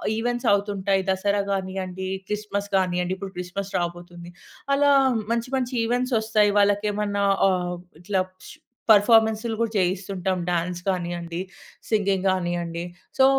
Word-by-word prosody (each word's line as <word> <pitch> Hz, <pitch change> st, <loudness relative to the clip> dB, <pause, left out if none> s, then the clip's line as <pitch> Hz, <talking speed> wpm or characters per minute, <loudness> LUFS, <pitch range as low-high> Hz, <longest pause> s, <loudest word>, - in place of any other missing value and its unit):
ఈవెంట్సవుతుంటాయి. 205 Hz, -4 st, +1 dB
Dasara 200 Hz, +2 st, +1 dB
గానియ్యండి, 190 Hz, -1 st, -3 dB, 0.2 s
Christmas 205 Hz, -1 st, -3 dB
గానియ్యండి. 180 Hz, -1 st, +1 dB
ఇప్పుడు 195 Hz, 0 st, -7 dB
Christmas 190 Hz, +2 st, -5 dB
రాబోతుంది. 175 Hz, 0 st, -5 dB, 0.4 s
అలా 285 Hz, 0 st, +4 dB, 0.4 s
మంచి, 235 Hz, +1 st, -1 dB
మంచి 255 Hz, -1 st, -1 dB
ఈవెంట్సొస్తాయి 225 Hz, -4 st, +2 dB
వాళ్ళకేమన్నా 205 Hz, 0 st, +1 dB, 0.2 s
ఆహ్, 180 Hz, -1 st, 0 dB, 0.3 s
ఇట్లా 190 Hz, 0 st, 0 dB, 0.7 s
పర్ఫార్మన్స్‌లు 220 Hz, +1 st, +4 dB
గూడా 230 Hz, -1 st, 0 dB
జేయిస్తుంటాం. 185 Hz, 0 st, -1 dB
Dance 175 Hz, +1 st, -2 dB
గానియ్యండి, 175 Hz, -1 st, -3 dB, 0.5 s
singing 195 Hz, -3 st, +1 dB
గానియ్యండి. 175 Hz, -2 st, -2 dB, 0.3 s
సో, 265 Hz, -, +8 dB
195 Hz, 105 wpm, -24 LUFS, 180-210 Hz, 0.7 s, సో